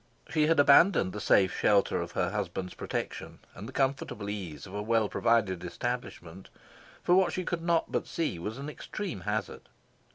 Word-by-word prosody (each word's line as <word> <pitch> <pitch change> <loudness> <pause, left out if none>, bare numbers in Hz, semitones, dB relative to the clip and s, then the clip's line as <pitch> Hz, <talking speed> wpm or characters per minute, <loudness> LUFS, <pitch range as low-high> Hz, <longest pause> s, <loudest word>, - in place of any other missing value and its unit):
She 155 -3 +3
had 165 -1 +3
abandoned 145 - +5
the 105 - -5
safe 95 -2 +3
shelter 100 -1 +2
of - - -6
her - - 0
husband's 90 -1 -3
protection - - -5 0.2
and 105 - -9
the - - -8
comfortable 135 -7 -1
ease 85 -8 -6
of 95 - -12
a 105 - -3
well 110 0 +2
provided 100 -6 +1
establishment 95 -3 -5 0.5
for 175 - +3
what 185 -1 +4
she 185 - -3
could 175 -1 -2
not 170 -1 +1
but - - -1
see 160 - -2
was 105 +7 -5
an 140 +1 -6
extreme 165 - -6
hazard. 105 0 -4
110 Hz, 175 wpm, -29 LUFS, 95-150 Hz, 0.5 s, abandoned